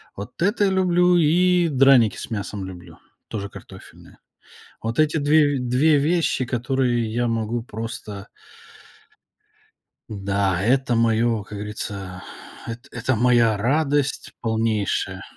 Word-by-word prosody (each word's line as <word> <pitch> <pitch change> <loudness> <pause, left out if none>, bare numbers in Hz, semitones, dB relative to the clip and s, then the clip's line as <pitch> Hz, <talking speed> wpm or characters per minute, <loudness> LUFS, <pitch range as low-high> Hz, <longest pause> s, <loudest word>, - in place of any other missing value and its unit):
Вот 105 +10 -9
это 205 +3 +2
я 195 - +1
люблю, 180 -1 +3
и 175 +2 +3
драники 135 -5 +4
с - - -8
мясом 100 -2 -4
люблю, 90 -3 -11 0.3
тоже 100 -2 -5
картофельные. - - -14 0.6
Вот 115 +6 -3
эти 155 +1 +2
2, 145 -2 +3
2 130 +5 +2
вещи, 155 -3 +1
которые 120 -2 -1
я 120 +1 0
могу 115 0 -2
просто 110 -2 -7 1.8
Да, 100 -3 -1
это 130 +2 +1
моё, 115 -1 +1
как 105 0 -9
говорится, 100 -3 -6 0.5
эт 120 +4 -7
это 125 +1 -1
моя 120 -2 +3
радость 145 +5 0
полнейшая. 110 -3 -1
120 Hz, 115 wpm, -22 LUFS, 105-145 Hz, 1.8 s, драники